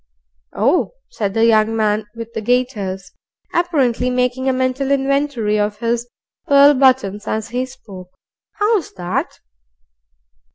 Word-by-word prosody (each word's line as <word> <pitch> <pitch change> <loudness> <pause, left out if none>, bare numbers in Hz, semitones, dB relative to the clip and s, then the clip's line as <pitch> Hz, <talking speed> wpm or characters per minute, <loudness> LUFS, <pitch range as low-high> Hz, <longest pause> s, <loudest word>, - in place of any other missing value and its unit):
"Oh!" 270 - +1 0.2
said 200 - -3
the 225 0 +3
young 220 -1 +3
man 215 -1 0
with 230 0 -8
the - - -3
gaiters, 210 -6 -1 0.4
apparently 275 -9 +1
making 250 +1 0
a - - +3
mental 260 +1 -1
inventory 275 -6 0
of 205 0 -1
his 235 +1 -2 0.4
pearl 280 +1 +7
buttons 255 -7 +2
as 220 0 -3
he 250 +2 -2
spoke. 195 -8 -12 0.5
"How's 415 -4 0
that?" 180 -2 -4
245 Hz, 125 wpm, -18 LUFS, 215-270 Hz, 0.5 s, pearl